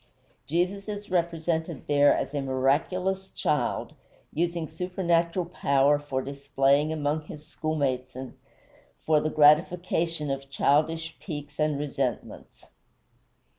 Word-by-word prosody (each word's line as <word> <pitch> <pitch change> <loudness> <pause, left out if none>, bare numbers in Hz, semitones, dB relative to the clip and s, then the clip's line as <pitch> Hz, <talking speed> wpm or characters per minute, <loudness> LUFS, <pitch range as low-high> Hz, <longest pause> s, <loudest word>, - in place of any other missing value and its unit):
Jesus 180 +7 -1
is 205 -2 -6
represented 165 -3 -1
there 145 0 +5
as - - -1
a 145 - -1
miraculous 160 +9 0
child, 150 - -1 0.4
using 170 0 -1
supernatural 175 0 0
power 145 -4 +2
for 135 -3 -3
display 140 +1 +1
among 155 0 -1
his 150 0 -10
schoolmates 140 -6 -2
and 130 0 -7 0.7
for 155 -1 +4
the 155 - 0
gratification 160 0 +3
of 135 0 -4
childish 160 +4 +1
piques 145 -4 -7
and 150 -1 +1
resentments. 140 -4 -4
155 Hz, 110 wpm, -27 LUFS, 140-170 Hz, 0.7 s, there